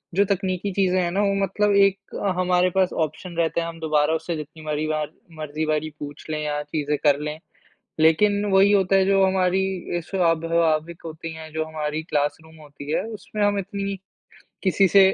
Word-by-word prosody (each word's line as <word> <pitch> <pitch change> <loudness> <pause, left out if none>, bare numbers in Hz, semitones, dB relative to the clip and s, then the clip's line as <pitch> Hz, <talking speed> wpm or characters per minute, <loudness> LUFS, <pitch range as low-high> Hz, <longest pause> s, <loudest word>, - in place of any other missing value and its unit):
जो 200 - +4
तकनीकी 190 0 -1
चीज़ें 185 -1 +2
हैं 175 - 0
ना 200 +3 +1
वो 200 -1 +2
मतलब 205 +2 +1
एक 195 0 +2 0.2
हमारे 180 0 +3
पास 190 -1 +2
ऑप्शन 170 +4 -9
रहते 170 0 +1
हैं 165 - -3
हम 165 0 -8
दोबारा 155 -1 +2
उससे 160 +1 -2
जितनी 155 +1 -8
मारी 155 0 -2
वार 155 -1 -2 0.3
मर्ज़ी 155 +1 -3
वारी 155 0 0
पूछ 145 0 -8
लें 155 -1 -2
या 150 0 -1
चीज़ें 150 -1 -2
कर 145 -1 +4
लें। 150 +1 -4 0.6
लेकिन 200 +6 +4
वही 195 +1 +5
होता 195 -1 +3
है 190 -1 +4
जो 195 0 +4
हमारी 190 0 +2 0.3
ये 175 - 0
स्वाभाविक 165 -2 +1
होती 160 0 -6
हैं, 160 -1 -9
जो 160 0 -1
हमारी 155 0 -3
क्लासरूम 155 +1 -2
होती 145 0 -9
है, - - +1
उसमें 215 -1 -4
हम 205 0 +2
इतनी, 200 +1 -3 0.7
किसी 195 0 +3
से 200 - +6
165 Hz, 185 wpm, -23 LUFS, 155-195 Hz, 0.7 s, से